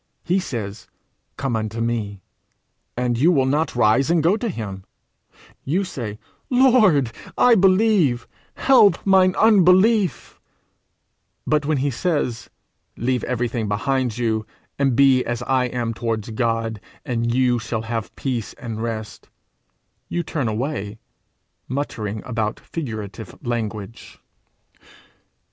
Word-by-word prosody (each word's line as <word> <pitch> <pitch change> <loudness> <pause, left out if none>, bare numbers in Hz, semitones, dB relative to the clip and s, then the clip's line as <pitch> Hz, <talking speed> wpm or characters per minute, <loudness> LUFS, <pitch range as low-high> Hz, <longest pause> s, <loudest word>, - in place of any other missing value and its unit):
He 180 +3 +1
says, 110 - -5 0.5
'Come 135 -4 -1
unto 110 0 -3
me,' 110 -5 -2 0.7
and 120 -1 0
you 165 +7 +5
will 135 -6 +3
not 145 +3 0
rise 120 +4 +3
and 170 -2 +2
go 175 +5 +4
to 230 +1 -3
him. 100 - -6 0.8
You 175 +9 0
say, 115 - -6 0.3
'Lord 225 - +4 0.3
I 245 - +6
believe; 190 - +3 0.3
help 250 -7 +5
mine 190 -1 +4
unbelief,' 205 0 +3 1.1
but 150 -1 +1
when 155 -2 +1
he 140 +1 0
says, 125 -5 -2 0.5
'Leave 125 0 -1
everything 120 -2 -2
behind 120 +3 -1
you, 110 -2 0 0.4
and 135 -3 +2
be 130 -1 +5
as 120 0 -3
I 130 0 +1
am 120 -2 -2
towards 115 -1 -3
God, 115 -2 -1 0.2
and 120 -3 -1
you 125 -1 +2
shall 115 -1 -4
have 115 -1 -4
peace 125 -5 -3
and 115 -2 -6
rest,' 110 -2 -5 0.8
you 175 - -1
turn 150 -6 -2
away, 110 -2 -3 0.7
muttering 110 -6 -3
about 110 -3 -2
figurative 110 - -7
language. 115 -2 -5
125 Hz, 120 wpm, -22 LUFS, 115-155 Hz, 1.1 s, I